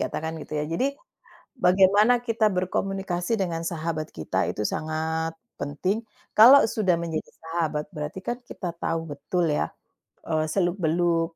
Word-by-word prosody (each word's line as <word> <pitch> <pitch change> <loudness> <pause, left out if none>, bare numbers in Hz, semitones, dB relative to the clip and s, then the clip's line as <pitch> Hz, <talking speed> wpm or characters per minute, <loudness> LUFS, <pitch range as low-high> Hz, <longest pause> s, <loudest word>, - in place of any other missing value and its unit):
katakan 160 +1 -3
gitu, 155 - -6
ya. 150 - 0
Jadi, 260 - -1 0.6
bagaimana 195 +4 +5
kita 230 -2 +2
berkomunikasi 190 +1 -1
dengan 170 -4 -1
sahabat 160 -2 -3
kita 80 - -2
itu 105 - -3
sangat 160 +2 -2 0.2
penting. 185 +9 -1 0.3
Kalau 255 +6 +9
sudah 210 -5 +1
menjadi 165 -2 -4
sahabat, 160 -2 -1
berarti 150 +3 -5
kan 240 - -2
kita 185 -7 -6
tahu 165 -1 -1
betul 175 +5 -1
ya, - - 0 0.6
eee, 155 -1 +1
seluk-beluk 170 -1 +1
170 Hz, 130 wpm, -25 LUFS, 160-195 Hz, 0.6 s, Kalau